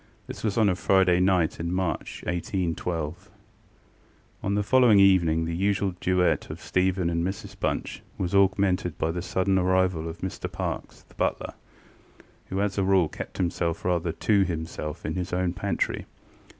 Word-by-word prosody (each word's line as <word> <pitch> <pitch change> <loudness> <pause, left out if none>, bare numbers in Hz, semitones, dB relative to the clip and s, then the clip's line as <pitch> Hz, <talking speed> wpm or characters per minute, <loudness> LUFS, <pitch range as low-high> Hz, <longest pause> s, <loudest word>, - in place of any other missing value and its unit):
This - - -8
was 105 -1 -1
on 110 -2 +4
a 95 - +3
Friday 95 -1 +3
night 90 -3 +2
in 85 +1 -2
March, 90 -4 -2
1812. 85 0 -3 1.1
On 100 +1 -1
the 105 - +1
following 120 -1 +5
evening 85 -5 +4
the 85 0 -3
usual 100 +1 0
duet 90 -1 +1
of 75 +3 -7
Stephen 90 +2 0
and 85 0 0
Mrs 95 +1 -5
Bunch - - -2 0.2
was 90 -1 -2
augmented 95 -3 +2
by 80 - 0
the 90 +1 -3
sudden 95 +1 +1
arrival 90 -3 +1
of 80 - -7
Mr 95 - -4
Parkes, - - -5
the - - -23
butler, - - -2 0.9
who 95 +1 -2
as 100 0 -1
a - - +2
rule 95 -4 +3
kept - - -8
himself 85 -2 -1
rather 85 -2 +1
to 100 +3 +2
himself 80 -2 -5
in 80 - -2
his 90 +1 -3
own 90 -1 0
pantry. 100 +1 -2
90 Hz, 165 wpm, -26 LUFS, 85-95 Hz, 1.1 s, following